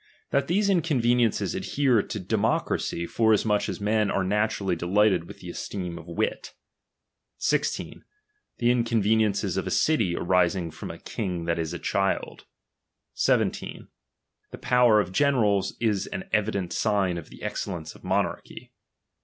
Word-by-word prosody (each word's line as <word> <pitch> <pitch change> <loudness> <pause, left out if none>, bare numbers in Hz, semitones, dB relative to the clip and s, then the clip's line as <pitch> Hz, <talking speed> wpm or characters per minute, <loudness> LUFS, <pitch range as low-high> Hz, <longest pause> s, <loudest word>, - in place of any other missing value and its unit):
That 140 0 +1
these 200 +4 +2
inconveniences 125 - +2
adhere 130 -6 +2
to 105 - -5
demo 105 +3 +1
cracy, 85 - -3
forasmuch 110 0 +2
as - - -4
men 105 0 +1
are 95 - 0
naturally 100 -1 0
delighted 90 +1 +2
with - - -12
the - - -8
esteem 90 -4 -5
of 80 - -13
wit. 100 +6 -3 0.8
16 - - -1 0.5
The 120 0 +3
inconveniences 110 -5 +1
of 95 - -2
a - - -1
city 110 - +2
arising 90 -1 +1
from 80 - -8
a - - -7
king 90 -6 -4
that 85 0 0
is 80 -1 -2
a 85 - -4
child. 95 +3 -1 0.7
17. - - 0 0.6
The - - -9
power 125 -3 +4
of 95 -3 -1
generals 105 -6 +2
is 105 -4 0
an 190 0 -6
evident 100 -4 0
sign 100 -5 +1
of 80 - -12
the - - -13
excellence 85 -5 -4
of - - -18
monarchy. - - -2
105 Hz, 145 wpm, -26 LUFS, 90-115 Hz, 0.8 s, power